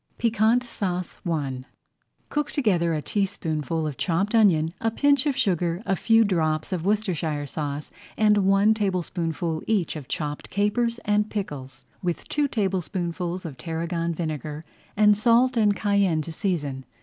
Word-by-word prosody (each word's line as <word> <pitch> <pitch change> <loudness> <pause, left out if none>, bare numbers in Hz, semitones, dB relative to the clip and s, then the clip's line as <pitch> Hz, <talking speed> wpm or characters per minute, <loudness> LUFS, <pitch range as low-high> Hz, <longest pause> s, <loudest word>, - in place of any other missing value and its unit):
PIQUANT 230 +1 +3
SAUCE 185 -7 -4
I 135 -6 -2 0.7
Cook 295 0 -1
together 175 - +1
a 150 - -3
teaspoonful 165 -5 -1
of 150 -3 -4
chopped 195 +4 0
onion, 170 -8 +4
a 225 - +2
pinch 280 +4 +2
of 280 - 0
sugar, 175 -1 0
a 195 - +1
few 225 +3 +4
drops 160 -4 0
of 175 -3 -2
Worcestershire 175 -8 0
sauce, 145 +1 -4 0.3
and 210 -1 +4
one 195 +2 +4
tablespoonful 175 -5 -2
each 205 -7 +1
[Page - - -3
34] 155 - -5
of 135 - -13
chopped 150 -1 -4
capers 230 +4 +1
and 210 +1 +2
pickles, 135 - -6 0.2
with 175 -2 -3
two 295 -1 +1
tablespoonfuls 185 - -2
of 145 -5 -6
tarragon 170 +1 -2
vinegar, 155 -1 -4 0.3
and 210 0 +6
salt 240 +4 +4
and 210 -3 +3
cayenne 200 -7 +2
to 165 - -7
season. 150 -8 -2
180 Hz, 150 wpm, -25 LUFS, 160-210 Hz, 0.7 s, and